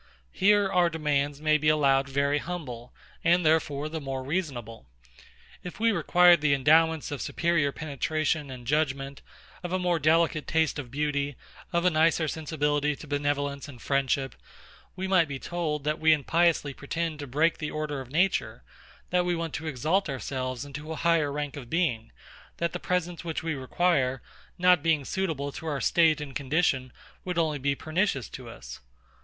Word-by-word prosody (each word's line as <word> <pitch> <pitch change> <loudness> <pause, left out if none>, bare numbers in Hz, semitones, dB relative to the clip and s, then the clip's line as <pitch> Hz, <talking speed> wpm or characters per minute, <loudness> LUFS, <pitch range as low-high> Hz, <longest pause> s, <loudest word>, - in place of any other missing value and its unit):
Here 205 +1 +4
our 180 -2 +3
demands 145 -3 -1
may 155 0 +3
be 150 +1 +2
allowed 140 -3 +3
very 140 +1 +1
humble, 135 -9 -6 0.3
and 175 +1 +3
therefore 155 -2 +1
the 160 0 -5
more 135 -1 -4
reasonable. 130 - -4 0.8
If 180 - -8
we 230 +1 +3
required 175 -2 +5
the 145 -2 +3
endowments 160 +3 +3
of 145 - -4
superior 170 -4 +1
penetration 155 +1 -2
and 125 -2 -9
judgement, 140 -1 -1 0.4
of 175 -1 -5
a 185 - +1
more 180 -2 +1
delicate 160 +1 +2
taste 160 -2 +1
of 130 -4 -6
beauty, 145 0 -1 0.4
of 170 0 0
a 180 - +5
nicer 160 0 +3
sensibility 150 -2 -1
to 140 - -11
benevolence 145 -1 -2
and 135 -5 -11
friendship; 135 +1 0 0.6
we 190 +1 -3
might 185 -4 +4
be 140 -1 -5
told, 155 -1 -3
that 150 +1 -1
we 160 0 +5
impiously 155 0 +1
pretend 160 +3 -4
to 145 - -6
break 155 +6 +1
the 150 - -3
order 150 -2 -3
of 130 - -11
Nature; 155 - 0 0.5
that 180 0 +3
we 175 0 0
want 165 -2 -4
to 160 - -4
exalt 155 +7 0
ourselves 130 -1 -4
into 150 +3 -8
a - - -3
higher 165 -3 +2
rank 145 -1 -4
of 130 -5 -9
being; 135 -10 -1 0.5
that 170 0 -1
the - - -3
presents 175 -1 -2
which 165 -2 -4
we 160 -1 -1
require, 135 -1 0 0.3
not 180 -2 +5
being 155 -3 +1
suitable 155 -7 -2
to 160 - -8
our 145 -3 -1
state 160 -1 +3
and 140 -3 -7
condition, 135 -2 0 0.3
would 180 -2 -4
only 155 -3 +1
be 140 +1 0
pernicious 155 - -1
to - - -9
us. - - -10
150 Hz, 170 wpm, -27 LUFS, 140-170 Hz, 0.8 s, required